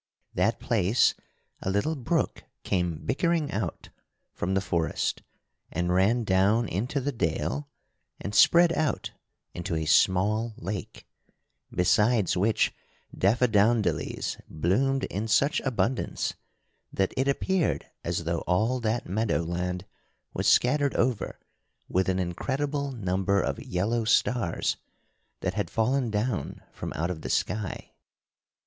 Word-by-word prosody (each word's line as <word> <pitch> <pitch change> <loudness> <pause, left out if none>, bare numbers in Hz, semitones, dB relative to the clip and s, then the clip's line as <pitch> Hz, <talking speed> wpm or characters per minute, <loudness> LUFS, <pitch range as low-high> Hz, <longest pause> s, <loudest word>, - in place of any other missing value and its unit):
That - - +1
place 100 +7 +3 0.5
a - - -2
little 100 +12 0
brook 150 +5 -1 0.2
came 90 -4 -1
bickering 165 +2 +1
out 100 -5 -4 0.4
from 95 +2 -2
the - - +3
forest 85 -4 -1 0.5
and 90 +1 0
ran 105 +6 +3
down 100 +4 +3
into 115 - -1
the 140 +2 -1
dale 145 +3 -2 0.5
and 100 - -5
spread 170 +8 +6
out 155 -2 -1 0.4
into 85 -1 -3
a 80 0 -1
small 105 +8 +3
lake, 95 +3 -6 0.6
besides 105 +3 +3
which 105 +4 +2 0.4
daffadowndillys 110 0 +1
bloomed 130 - +1
in 105 +3 -3
such 140 +6 +3
abundance 130 -1 -1 0.6
that 95 -1 0
it 130 +1 +1
appeared 175 +5 +1 0.2
as - - -2
though - - -1
all 110 +8 +2
that 115 0 -1
meadow 105 -2 0
land 90 +2 -3 0.5
was - - -1
scattered 140 +2 +3
over 120 -2 0 0.5
with 95 +1 +1
an 95 - +1
incredible 140 - -2
number 95 -3 0
of - - -2
yellow 110 +6 0
stars 115 -4 +1 0.6
that - - -1
had - - -2
fallen 125 +2 +1
down 105 0 -2
from - - -6
out 85 +4 -1
of 80 -3 -6
the - - -5
sky. 105 +1 -2
110 Hz, 125 wpm, -27 LUFS, 95-125 Hz, 0.6 s, spread